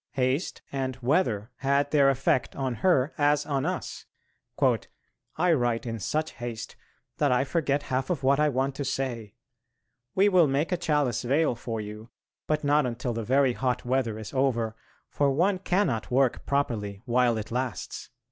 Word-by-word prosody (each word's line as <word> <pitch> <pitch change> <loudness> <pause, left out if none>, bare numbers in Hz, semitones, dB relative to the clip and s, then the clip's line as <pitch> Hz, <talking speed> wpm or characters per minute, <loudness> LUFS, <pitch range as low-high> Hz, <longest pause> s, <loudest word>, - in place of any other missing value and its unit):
Haste 135 +5 -1
and 130 -2 -2
weather 120 - +1
had 140 +1 +1
their 140 -2 +5
effect 135 -1 +1
on 130 -2 -2
her 155 -6 +3
as 145 0 +3
on 140 0 -1
us: 185 - -4 1.3
"I 180 -1 +3
write 120 -5 0
in 115 -1 -4
such 155 +10 -1
haste 120 -2 -6 0.4
that 145 -3 +3
I 125 +1 +3
forget 145 -1 0
half 130 0 -2
of 160 -6 -2
what 135 +2 +3
I 150 0 +4
want 135 0 0
to 145 - -2
say.... 125 -6 -3 0.8
We 195 +2 +5
will 180 -5 +5
make 140 +5 0
a 180 - +1
chalice 145 -8 0
veil 140 +4 +2
for 115 -1 -5
you, 105 +2 -8 0.4
but 155 0 0
not 145 -1 +3
until 120 +1 -3
the 115 - -3
very 130 +2 +3
hot 125 -1 -1
weather 120 -3 0
is 110 0 -8
over, 120 -5 0 0.3
for 145 -1 +1
one 180 +7 +2
cannot 180 - 0
work 130 0 +1
properly 110 -8 -1
while 120 -2 +2
it 110 0 -6
lasts." 125 +1 -4
135 Hz, 165 wpm, -27 LUFS, 120-145 Hz, 1.3 s, their